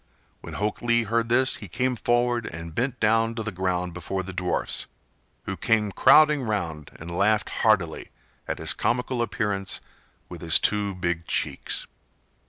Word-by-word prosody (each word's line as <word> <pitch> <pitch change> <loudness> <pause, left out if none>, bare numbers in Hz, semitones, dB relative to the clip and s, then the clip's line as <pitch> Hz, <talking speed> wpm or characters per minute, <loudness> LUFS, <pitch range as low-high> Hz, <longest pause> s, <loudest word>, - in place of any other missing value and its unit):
When - - -9
Hok 105 +1 -2
Lee 120 0 +2
heard 115 +1 0
this 130 +3 +3
he 100 - -9
came 125 +6 -1
forward 120 0 +1
and 85 0 -7
bent 125 - -1
down 115 +1 +2
to 110 - -3
the 110 - -4
ground 90 -1 -2
before 95 +2 -4
the 95 +1 -7
dwarfs, 90 0 -1 0.6
who - - -4
came 110 -2 +1
crowding 150 +6 +6
round 85 - -3
and 85 +2 -8
laughed 105 +3 +2
heartily 100 -8 +1 0.4
at - - -2
his - - 0
comical 125 0 -1
appearance 105 -5 -1 0.5
with - - -10
his - - +5
two 100 -2 0
big 85 -2 -2
cheeks. - - -1
105 Hz, 160 wpm, -25 LUFS, 90-120 Hz, 0.6 s, crowding